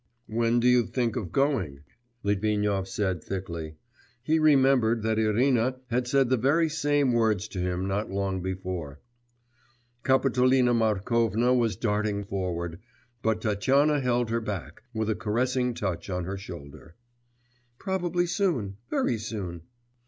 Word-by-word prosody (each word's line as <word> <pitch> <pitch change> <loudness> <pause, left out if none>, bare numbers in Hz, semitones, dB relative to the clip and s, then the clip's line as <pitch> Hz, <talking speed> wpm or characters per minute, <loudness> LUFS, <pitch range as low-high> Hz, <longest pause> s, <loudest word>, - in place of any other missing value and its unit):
'When 115 +2 +1
do 120 - +2
you 125 -2 +4
think 120 -4 -1
of 100 -9 -4
going?' 125 - 0 0.4
Litvinov 105 -1 0
said 95 -4 -2
thickly. 85 -5 -5 0.5
He 160 +4 +2
remembered 135 -7 +4
that 110 0 +1
Irina 120 +3 +2 0.2
had 125 +1 0
said 135 0 +3
the 130 - +3
very 150 +7 +2
same 145 -3 +1
words 110 -3 +1
to 95 - -6
him 90 +1 -1
not 100 +3 -2
long 95 -1 -2
before. 90 -6 -5 1.0
Kapitolina 130 -1 +3
Markovna 115 +2 +2
was 120 -3 +2
darting 105 -2 -1
forward, 90 -4 -3 0.4
but 110 -1 0
Tatyana 135 +9 +2
held 120 -3 0
her 115 0 0
back, 95 -8 -6
with 110 -2 -2
a 110 - +2
caressing 125 +3 0
touch 90 -4 -3
on 90 -2 -2
her 95 +2 -4
shoulder. 80 -4 -10 0.8
'Probably 175 0 -1
soon, 170 - -1
very 115 - 0
soon. 95 -6 -5
110 Hz, 135 wpm, -27 LUFS, 95-125 Hz, 1.0 s, you